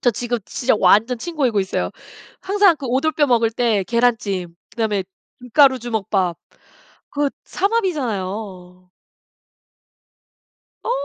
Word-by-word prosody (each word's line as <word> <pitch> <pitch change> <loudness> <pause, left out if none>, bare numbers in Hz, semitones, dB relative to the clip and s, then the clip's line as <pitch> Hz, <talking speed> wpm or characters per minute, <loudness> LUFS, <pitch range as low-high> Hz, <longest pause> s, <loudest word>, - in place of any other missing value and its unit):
저 245 - +3
지금 240 +2 -2
진짜 260 +2 0
완전 220 +6 +4
침 340 +6 -6
고이고 255 -8 +1
있어요. 190 -1 -1 0.5
항상 395 -3 +3
그 275 - -6
오돌뼈 290 +4 +1
먹을 230 -3 +2
때 225 -3 +1
계란찜 215 -7 0 0.2
그다음에 215 -4 -1 0.4
김가루 260 +1 +4
주먹밥 205 -6 -1 0.7
그거 290 -1 0
삼합이잖아요. 205 - -3 1.9
어. - - -4
235 Hz, 245 characters per minute, -20 LUFS, 200-275 Hz, 1.9 s, 완전